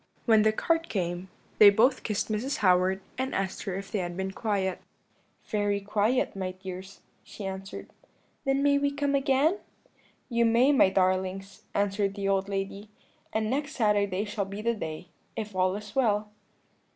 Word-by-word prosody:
When 220 -2 +5
the 215 0 +4
cart 330 +8 0
came 180 -1 -3 0.3
they 210 - +11
both 240 +6 +3
kissed 210 0 -2
Mrs. 240 +6 -1
Howard, 185 +1 +3 0.2
and 265 +1 -2
asked 195 -1 -2
her 190 - -2
if 195 0 -6
they 210 - -1
had 175 -1 -4
been 190 0 -2
quiet. 195 -3 -1 0.6
"'Very 205 -1 0
quiet, 210 +5 0
my 185 -1 -3
dears,' 190 +1 -9 0.2
she 205 - -9
answered. 195 0 -6 0.6
"'Then 270 0 +1
may 285 0 +4
we 285 0 +2
come 285 0 -1
again?' 280 +6 +2 0.7
"'You 235 -2 +1
may, 235 +4 +4
my 270 -9 +5
darlings,' 190 +1 -1
answered 200 0 0
the 200 -1 -2
old 195 0 +1
lady; 195 +1 -4 0.4
'and 220 0 0
next 285 +5 -2
Saturday 205 -3 +1
shall 205 -1 -2
be 200 +2 -7
the 235 +1 +2
day, 160 -5 -6 0.3
if 210 -2 -5
all 185 0 +2
is 210 +2 -8
well.' 210 -5 +1
205 Hz, 165 wpm, -28 LUFS, 190-235 Hz, 0.7 s, they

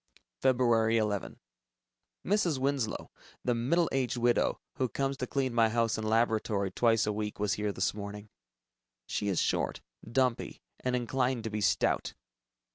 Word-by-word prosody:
Feb. 130 -2 +3 0.3
11 105 -4 0 0.9
Mrs. 185 -6 +2
Winslow, 135 -4 -1 0.3
the 125 - +3
middle 145 +9 +2
aged 130 -2 0
widow, 120 0 +2 0.2
who 130 -2 0
comes 135 +2 -1
to 125 - -3
clean 130 -3 -1
my 115 -1 +4
house 115 0 +1
and 110 -1 -2
laboratory 110 -3 +1
twice 115 +1 +3
a 105 - 0
week, 105 0 -4
was 105 -1 +1
here 105 0 -1
this 95 -1 0
morning. 105 0 -7 0.8
She 105 - -2
is 95 -4 +1
short, - - 0 0.3
dumpy, 125 -1 0 0.2
and 125 0 -1
inclined 125 0 0
to 110 - -4
be 105 0 -2
stout. 100 - +1
115 Hz, 150 wpm, -30 LUFS, 105-130 Hz, 0.9 s, my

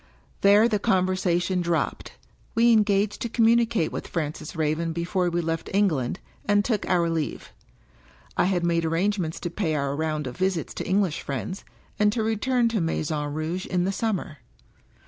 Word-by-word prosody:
There 205 +3 +6
the 215 -3 0
conversation 185 -3 +1
dropped. 170 -1 -2 0.4
We 235 +1 +5
engaged 205 -1 +2
to 235 - -2
com 230 0 +2
mimicate 230 -6 +3
with - - -5
Francis 155 0 -4
Raven 160 +1 0
before 175 +2 0
we 175 0 0
left 165 0 -3
England, 160 -12 +1 0.2
and 205 0 +2
took 220 -5 -1
our 175 -2 +3
leave. 165 -3 -3 0.8
I - - +3
had 180 -2 +1
made 170 -1 +1
arrangements 170 +1 0
to 175 - -3
pay 165 -4 -1
our 140 -1 -1
round 155 -1 -2
of 125 -1 -5
visits 185 -3 -1
to - - -5
English 190 -4 +1
friends, 145 +8 -5 0.4
and 210 0 +4
to 225 -2 0
return 235 +3 +1
to 225 -4 0
Maison 150 -2 -1
Rouge 160 +5 -3
in 180 -1 0
'the 190 - 0
summer. 195 -7 -2
180 Hz, 165 wpm, -25 LUFS, 160-205 Hz, 0.8 s, There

